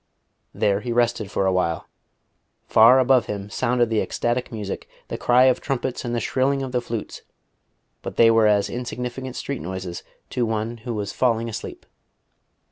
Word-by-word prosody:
There 100 -2 +1
he 120 +2 -4
rested 120 -3 +1
for 100 - 0
a 95 - +2
while. 85 -3 -1 0.8
Far 115 +4 +7
above 130 -2 +4
him 100 0 -5
sounded 120 -1 +1
the 110 - +2
ecstatic 120 +1 -2
music, 105 -4 -5 0.2
the - - -3
cry 125 +1 +4
of 130 -1 +3
trumpets 130 -2 -2
and 120 0 -2
the - - +1
shrilling 135 +4 0
of 130 - -5
the 125 -1 0
flutes; 115 -3 -5 0.8
but - - -6
they 115 -1 +6
were 115 -1 +4
as 100 -1 +3
insignificant 125 +1 -5
street 140 -2 -4
noises 95 -1 -5 0.3
to 125 - 0
one 110 +1 -2
who 115 +1 -5
was 100 -1 -3
falling 115 -2 +1
asleep. 105 - -7
115 Hz, 170 wpm, -23 LUFS, 105-125 Hz, 0.8 s, Far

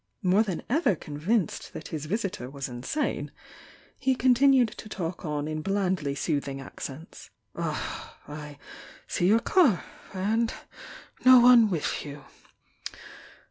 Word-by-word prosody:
More 185 +3 +4
than 195 -6 -2
ever 280 - +2
convinced 160 +6 -2
that - - -8
his 155 -1 -5
visitor 195 - -3
was 135 0 -5
insane, 125 - -3 0.7
he 265 -1 +2
con 255 0 +4
tinued 260 -3 +4
to 215 - -10
talk 170 -3 -4
on 150 -1 -2
in 155 0 -3
blandly 185 -6 -1
soothins; 140 -3 -2
accents; 135 +3 -9 0.3
"Ah, - - -4
I 150 0 -8 0.5
see 175 - 0
your 220 +4 +5
car? 280 - +3 0.3
And 220 +5 0 0.7
no 255 0 +9
one 240 -2 +7
with 170 -6 -2
you? 145 -1 -9
185 Hz, 130 wpm, -27 LUFS, 150-230 Hz, 0.7 s, no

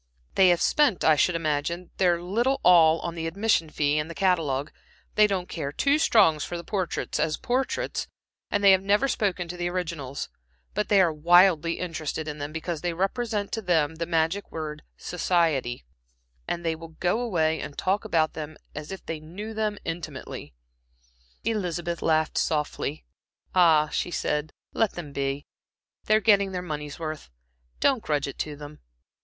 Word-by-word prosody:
"They 190 -1 +6
have 175 -1 +3
spent, 290 - +3
I 155 - +6
should 175 +4 +2
imagine, 165 +2 -2
their 175 -2 +3
little 235 +10 0
all 165 -2 +6
on 170 - -4
the 165 -1 -4
admission 190 -2 +1
fee 150 0 +1
and 150 +2 -3
the 170 - -7
catalogue; 155 -7 +1 0.4
they 210 0 +5
don't 190 -3 -2
care 145 -6 -4
two 280 - +2
straws 180 - +4
for 175 - -4
the 170 - -7
portraits 190 -1 -2
as 155 -1 +1
portraits, 265 - -1 0.4
and 205 - 0
they 200 - +8
have 190 0 +5
never 205 +7 +2
spoken 195 -8 -1
to 180 +1 -7
the 175 0 -1
originals, 165 -7 -4 0.5
but 210 +1 -1
they 205 - +5
are 170 -4 +3
wildly 170 +1 +5
interested 160 -3 -4
in 150 0 -5
them 145 +1 -4
because 160 0 -4
they 175 0 -1
represent 205 +3 -1
to 225 - -2
them 160 -5 +1
the 170 0 -3
magic 165 +4 0
word 150 -1 -5 0.2
'society,' 165 - 0 0.6
and 170 0 -3
they 165 - +1
will 160 0 -12
go 180 +5 +1
away 160 -9 +1
and 145 - -7
talk 195 +3 0
about 165 -7 +1
them 155 0 -7 0.2
as 150 +3 -7
if 190 - -8
they 160 -1 -4
knew 190 +8 -8
them 215 -1 -1
intimately." 155 - -6 0.9
Elizabeth 175 -6 -2
laughed 160 -1 +1
softly. 150 -1 -2 0.5
"Ah," 160 -4 +5
she - - -2
said 150 -2 -1 0.2
"let 225 -3 +1
them 165 -5 -7
be. 140 +1 -2 0.6
They're 215 0 +4
getting 200 -3 +4
their 180 -1 -3
money's 150 -4 -5
worth; 155 -2 -6 0.5
don't 265 -4 +3
grudge 145 -6 -1
it 140 - -8
to 150 -1 -3
them. 145 +1 -10
170 Hz, 170 wpm, -26 LUFS, 155-195 Hz, 0.9 s, they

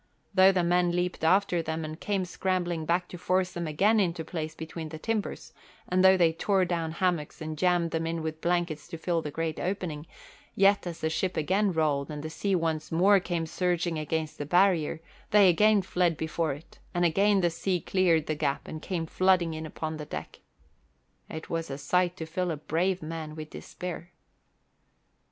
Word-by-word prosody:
Though 190 0 +7
the 185 -2 +1
men 175 0 +2
leaped 180 -2 -2
after 180 +1 +3
them 160 0 -3
and 155 +1 -7
came 195 -3 -1
scrambling 175 -3 -2
back 180 +1 +1
to 180 - -8
force 185 +1 +1
them 170 -1 -4
again 200 +9 +3
into 170 -4 0
place 155 -3 -5
between 160 0 -6
the 155 - -7
timbers, 215 +4 -3 0.3
and 185 +1 +2
though 190 0 +7
they 170 -3 +4
tore 190 +3 +1
down 165 -2 -2
hammocks 170 -4 -1
and 155 0 -5
jammed 175 0 +2
them 165 0 -1
in 165 -1 -3
with 160 0 -4
the - - -2
blankets 175 -3 0
to 170 -1 -7
fill 170 0 0
the 150 - -5
great 160 +1 -3
opening, 175 -5 -3 0.5
yet 195 -1 +4
as 170 -2 -6
the 160 - +1
ship 185 +3 -1
again 195 +6 +2
rolled 150 -4 0
and 150 -1 -6
the 155 - -5
sea 195 +3 0
once 160 -3 -1
more 195 +5 +5
came 175 -2 -2
surging 175 -1 -1
against 155 0 -3
the 145 - -3
barrier, 175 -2 +3 0.3
they 205 -2 +6
again 210 +3 +4
fled 175 -3 +1
before 160 0 -1
it, 145 +4 -13 0.2
and 175 0 +3
again 195 +4 +3
the 175 -1 +2
sea 180 +2 -1
cleared 170 -4 +2
the 155 - -1
gap 145 -2 -2
and 155 - -6
came 170 -2 -3
flooding 180 -1 +2
in 155 0 -5
upon 155 0 -5
the 150 - -6
deck. 75 - -7 0.9
It 160 - -7
was 165 -2 -3
a 135 - -4
sight 180 +4 +1
to 160 - -5
fill 180 +3 -2
a 160 - -2
brave 175 +4 -1
man 155 -1 -6
with 155 -1 -8
despair. 175 -1 -7
170 Hz, 195 wpm, -28 LUFS, 160-185 Hz, 0.9 s, Though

